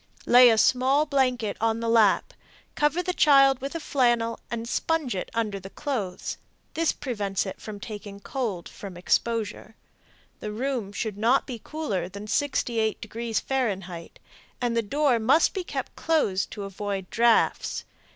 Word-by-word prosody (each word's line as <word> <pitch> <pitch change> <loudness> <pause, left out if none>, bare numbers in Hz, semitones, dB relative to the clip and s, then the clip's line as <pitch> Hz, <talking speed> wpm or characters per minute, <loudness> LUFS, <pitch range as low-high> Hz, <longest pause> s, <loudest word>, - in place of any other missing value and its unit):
Lay 245 0 +8
a 225 - +3
small 265 +6 +3
blanket 255 -7 0
on 225 0 +1
the 230 - -3
lap, 225 -3 +3 0.4
cover 300 +4 +1
the 365 0 -1
child 275 -5 +5
with 275 +4 -5
a - - -1
flannel 240 -6 +1
and 230 0 -4
sponge 315 0 0
it 180 - -4
under 215 -3 -1
the 190 0 -10
clothes. 210 -9 -4 0.4
This 330 0 +1
prevents 205 -8 -2
it 190 - -7
from 210 -2 -7
taking 205 -1 -8
cold 205 -6 -4
from 195 -3 -9
exposure, 220 +3 -1 0.6
The 210 - -5
room 240 -2 -2
should 205 0 -4
not 240 +5 +3
be 240 -4 -7
cooler 205 - -3
than 200 +2 -8
68 225 -3 0
deg. 230 -1 -3
F., 195 -10 -2 0.5
and 240 -2 -1
the 230 - +3
door 270 +2 +1
must 265 +9 +4
be 380 - -3
kept - - -5
closed 255 -13 +1
to 205 - -7
avoid 195 -1 -4
drafts. 235 0 +2
230 Hz, 155 wpm, -26 LUFS, 205-270 Hz, 0.6 s, Lay